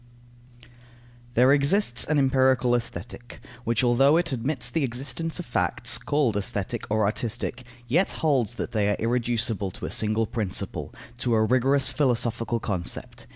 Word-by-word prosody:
_ -, -, -18 dB, 0.7 s
There 125 Hz, +3 st, +5 dB
exists 140 Hz, -, +2 dB
an 155 Hz, -, +1 dB
empirical 130 Hz, -2 st, +3 dB
Aesthetic, 120 Hz, 0 st, -5 dB, 0.3 s
which 115 Hz, +1 st, +1 dB
although 135 Hz, +5 st, +4 dB
it 170 Hz, -2 st, 0 dB
admits 125 Hz, 0 st, -1 dB
the 145 Hz, +5 st, -1 dB
existence 135 Hz, +6 st, -3 dB
of 180 Hz, -, -6 dB
facts, -, -, 0 dB
called 145 Hz, -7 st, 0 dB
aesthetic 100 Hz, +3 st, -3 dB
or 110 Hz, 0 st, +2 dB
artistic, 120 Hz, +4 st, -2 dB, 0.2 s
yet 170 Hz, +11 st, +1 dB
holds 130 Hz, -8 st, 0 dB
that -, -, -4 dB
they 105 Hz, -2 st, +1 dB
are 105 Hz, -, +1 dB
irreducible 115 Hz, -3 st, -1 dB
to -, -, -8 dB
a -, -, -5 dB
single 110 Hz, +1 st, +2 dB
principle, 110 Hz, -4 st, -3 dB, 0.3 s
to 120 Hz, -2 st, +1 dB
a 110 Hz, -, +3 dB
rigorous 130 Hz, +3 st, +2 dB
philosophical 120 Hz, -4 st, 0 dB
concept. 90 Hz, -5 st, -5 dB
120 Hz, 150 wpm, -25 LUFS, 115-135 Hz, 0.7 s, There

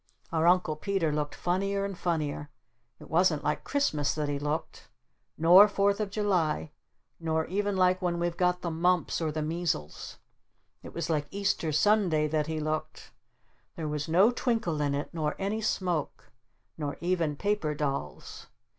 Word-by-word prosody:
Our 165 Hz, 0 st, +2 dB
Uncle 180 Hz, -3 st, +3 dB
Peter 190 Hz, -3 st, 0 dB
looked 150 Hz, 0 st, -2 dB
funnier 195 Hz, +2 st, -1 dB
and 200 Hz, -1 st, -4 dB
funnier. 155 Hz, -4 st, -2 dB, 0.5 s
It -, -, -12 dB
wasn't -, -, +2 dB
like -, -, -1 dB
Christmas 155 Hz, -, 0 dB
that 150 Hz, -2 st, -2 dB
he 145 Hz, -1 st, -2 dB
looked. 150 Hz, +2 st, -4 dB, 0.5 s
Nor 180 Hz, +6 st, +8 dB
Fourth 200 Hz, 0 st, +1 dB
of 210 Hz, -2 st, -1 dB
July. 180 Hz, -, 0 dB, 0.5 s
Nor 160 Hz, -1 st, 0 dB
even 200 Hz, +1 st, -1 dB
like 185 Hz, 0 st, +3 dB
when 175 Hz, -1 st, 0 dB
we've 170 Hz, 0 st, -1 dB
got 180 Hz, 0 st, +1 dB
the 170 Hz, -, -2 dB
mumps 175 Hz, +1 st, +1 dB
or 160 Hz, -1 st, 0 dB
the 155 Hz, 0 st, -2 dB
measles. 160 Hz, -, -3 dB, 0.6 s
It -, -, -11 dB
was -, -, -2 dB
like 150 Hz, -2 st, 0 dB
Easter 195 Hz, -5 st, -1 dB
Sunday 170 Hz, -3 st, +3 dB
that 155 Hz, -1 st, 0 dB
he 160 Hz, -1 st, -2 dB
looked! 155 Hz, 0 st, -4 dB, 0.6 s
There 160 Hz, -2 st, -4 dB
was 150 Hz, 0 st, -3 dB
no 190 Hz, +8 st, +5 dB
twinkle 225 Hz, -, -1 dB
in 145 Hz, -1 st, 0 dB
it. 145 Hz, +4 st, -4 dB
Nor 155 Hz, -2 st, -1 dB
any 200 Hz, +3 st, -2 dB
smoke. 180 Hz, -7 st, -2 dB, 0.5 s
Nor 145 Hz, -2 st, -3 dB
even 170 Hz, -4 st, 0 dB
paper 200 Hz, -4 st, -1 dB
dolls. 140 Hz, -, -4 dB
170 Hz, 160 wpm, -29 LUFS, 150-195 Hz, 0.6 s, Nor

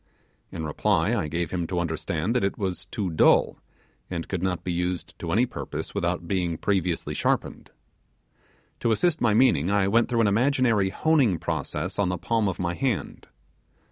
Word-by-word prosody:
In 80 Hz, -, -5 dB
reply, 75 Hz, -, +1 dB
I 75 Hz, -, -1 dB
gave 85 Hz, +1 st, -3 dB
him 85 Hz, -2 st, -2 dB
to 90 Hz, 0 st, -2 dB
understand 85 Hz, +4 st, -2 dB
that 125 Hz, -, +2 dB
it 95 Hz, -, -1 dB
was 95 Hz, -3 st, -3 dB
too 95 Hz, -1 st, -3 dB
dull, 80 Hz, -, +3 dB, 0.5 s
and 85 Hz, -2 st, -4 dB
could 90 Hz, -3 st, -3 dB
not 90 Hz, -2 st, -1 dB
be 90 Hz, -, -2 dB
used 90 Hz, 0 st, -2 dB
to 85 Hz, -, -4 dB
any 115 Hz, +8 st, +3 dB
purpose 125 Hz, -, -6 dB
without 85 Hz, 0 st, -2 dB
being 85 Hz, -3 st, -1 dB
previously 90 Hz, -3 st, -1 dB
sharpened. -, -, -1 dB, 1.1 s
To 115 Hz, -, 0 dB
assist 160 Hz, +8 st, +1 dB
my 110 Hz, -3 st, +3 dB
meaning, 100 Hz, -, +4 dB
I 100 Hz, -1 st, +2 dB
went 115 Hz, +4 st, +3 dB
through 120 Hz, -2 st, +2 dB
an 110 Hz, -, +3 dB
imaginary 115 Hz, -2 st, +2 dB
honing 135 Hz, -, +2 dB
process 85 Hz, +4 st, -3 dB
on 100 Hz, -3 st, +2 dB
the 90 Hz, -, -1 dB
palm 115 Hz, +3 st, 0 dB
of 95 Hz, -, -2 dB
my 85 Hz, -1 st, -1 dB
hand. 125 Hz, +1 st, -3 dB
95 Hz, 175 wpm, -25 LUFS, 85-115 Hz, 1.1 s, meaning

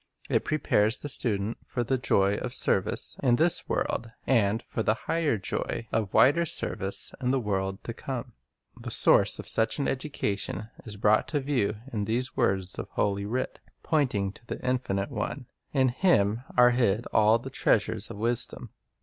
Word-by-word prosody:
It -, -, +1 dB
prepares 115 Hz, -7 st, +2 dB
the 145 Hz, -, -5 dB
student 110 Hz, -4 st, 0 dB
for 120 Hz, -, -3 dB
the 130 Hz, +2 st, 0 dB
joy 100 Hz, -3 st, +2 dB
of -, -, -4 dB
service -, -, 0 dB
in 125 Hz, -3 st, +4 dB
this 165 Hz, +6 st, +3 dB
world, 115 Hz, -, -1 dB, 0.2 s
and 110 Hz, -4 st, +2 dB
for -, -, -4 dB
the 110 Hz, 0 st, +2 dB
higher 165 Hz, -8 st, +1 dB
joy 110 Hz, +3 st, -4 dB
of 105 Hz, -4 st, -1 dB
wider 145 Hz, +6 st, +5 dB
service 100 Hz, -, -3 dB
in 125 Hz, -, 0 dB
the 135 Hz, +1 st, +2 dB
world 95 Hz, -3 st, -2 dB
to -, -, -5 dB
come. -, -, -6 dB, 0.4 s
The -, -, -8 dB
source -, -, +4 dB
of -, -, -8 dB
such 110 Hz, 0 st, +2 dB
an 140 Hz, -, -1 dB
education 110 Hz, -6 st, -3 dB
is 105 Hz, -3 st, -7 dB
brought 105 Hz, +1 st, +3 dB
to 150 Hz, -, -1 dB
view 130 Hz, -7 st, 0 dB, 0.2 s
in 105 Hz, -2 st, -1 dB
these 125 Hz, +4 st, -1 dB
words 95 Hz, -6 st, 0 dB
of -, -, -5 dB
Holy 100 Hz, 0 st, 0 dB
Writ, 125 Hz, +4 st, -3 dB, 0.2 s
pointing 125 Hz, -11 st, 0 dB
to 115 Hz, +3 st, -19 dB
the -, -, -5 dB
Infinite 100 Hz, -6 st, -1 dB
One: 140 Hz, -, -4 dB, 0.3 s
In 130 Hz, -2 st, +3 dB
Him 120 Hz, -, +2 dB
"are 125 Hz, 0 st, +7 dB
hid 120 Hz, -2 st, +1 dB
all 110 Hz, +1 st, +5 dB
the 130 Hz, +3 st, -9 dB
treasures 110 Hz, -4 st, 0 dB
of 115 Hz, -, -8 dB
wisdom." 115 Hz, +2 st, -1 dB
115 Hz, 175 wpm, -27 LUFS, 100-130 Hz, 0.4 s, are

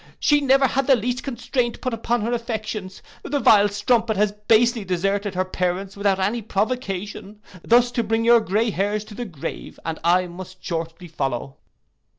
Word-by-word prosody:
She 295 Hz, -1 st, +3 dB
never 270 Hz, 0 st, +4 dB
had 270 Hz, 0 st, 0 dB
the 270 Hz, -, +6 dB
least 245 Hz, +2 st, -2 dB
constraint 245 Hz, -2 st, -2 dB
put 255 Hz, -, -3 dB
upon 230 Hz, +1 st, -1 dB
her 230 Hz, +3 st, -1 dB
affections. 215 Hz, -4 st, -4 dB, 0.2 s
The 285 Hz, 0 st, -2 dB
vile 210 Hz, -4 st, +6 dB
strumpet 220 Hz, +1 st, +1 dB
has 210 Hz, 0 st, +2 dB
basely 225 Hz, +2 st, +2 dB
deserted 195 Hz, +2 st, -1 dB
her 185 Hz, +1 st, 0 dB
parents 185 Hz, +1 st, -2 dB
without 200 Hz, -1 st, +1 dB
any 210 Hz, +5 st, 0 dB
provocation, 210 Hz, -1 st, -3 dB, 0.2 s
thus 240 Hz, +1 st, +4 dB
to 235 Hz, -, 0 dB
bring 225 Hz, +1 st, 0 dB
your 235 Hz, 0 st, +7 dB
grey 220 Hz, +2 st, 0 dB
hairs 205 Hz, +2 st, -1 dB
to 215 Hz, 0 st, -12 dB
the 240 Hz, +3 st, -5 dB
grave, 165 Hz, -10 st, -7 dB
and 165 Hz, -1 st, -3 dB
I 180 Hz, +2 st, +3 dB
must 185 Hz, +1 st, -10 dB
shortly 165 Hz, +1 st, -4 dB
follow. 135 Hz, -4 st, -3 dB
210 Hz, 170 wpm, -22 LUFS, 190-240 Hz, 0.2 s, your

